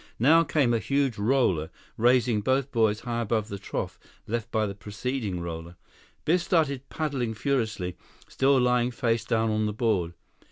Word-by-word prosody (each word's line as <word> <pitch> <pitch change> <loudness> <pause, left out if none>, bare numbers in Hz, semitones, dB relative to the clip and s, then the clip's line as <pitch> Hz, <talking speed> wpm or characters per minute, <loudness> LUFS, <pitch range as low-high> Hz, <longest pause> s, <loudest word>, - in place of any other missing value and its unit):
Now 160 +8 +5
came 140 -7 +2
a 115 - +2
huge 140 -3 0
roller, 100 - +2 0.3
raising 120 -2 +3
both 130 +4 0
boys 110 -3 +2
high 120 -1 -2
above 110 -1 -1
the 100 - -5
trough - - -4 0.3
left 115 -2 -3
by 110 -1 +1
the 100 - -4
preceding 105 0 -4
roller. 85 0 -6 0.5
Biff 175 +3 +3
started 140 -6 0
paddling 135 -8 -2
furiously, 110 -8 -1 0.3
still 135 0 +3
lying 125 -1 +2
face 115 -2 0
down 115 0 +1
on 110 0 +1
the 105 - -2
board. 100 -7 0
115 Hz, 160 wpm, -27 LUFS, 105-130 Hz, 0.5 s, Now